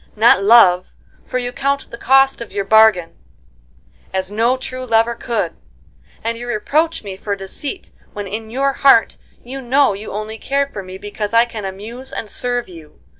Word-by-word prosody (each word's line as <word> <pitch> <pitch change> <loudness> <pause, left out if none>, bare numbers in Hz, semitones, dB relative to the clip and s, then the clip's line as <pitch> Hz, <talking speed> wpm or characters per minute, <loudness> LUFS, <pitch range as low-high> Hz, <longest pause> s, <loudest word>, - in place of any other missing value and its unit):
Not 215 -3 +5
love, 195 -5 +5 0.3
for - - -2
you 245 -1 -3
count 275 +2 -2
the - - -6
cost 270 0 +3
of 235 - -8
your 200 -1 -2
bargain, 220 -5 +5 1.0
as 190 0 -2
no 230 +5 +1
true 255 0 -5
lover 230 -1 +2
could, 235 0 -3 0.7
and 230 0 -2
you 245 - -7
reproach 300 +9 0
me 195 -2 -6
for 200 +1 -3
deceit 200 - -6 0.2
when 205 -1 -5
in 220 +3 -5
your 270 +4 0
heart 270 -5 +4 0.3
you 265 +3 -7
know 265 0 +3
you 205 +2 -8
only 215 +2 -5
cared 280 +3 -1
for 200 - -5
me 185 0 -9
because 205 +2 -5
I 230 +1 +6
can 225 -4 -7
amuse 225 +7 -7
and 215 - -5
serve 245 -1 -2
you. 160 -4 -14
230 Hz, 175 wpm, -18 LUFS, 205-255 Hz, 1.0 s, I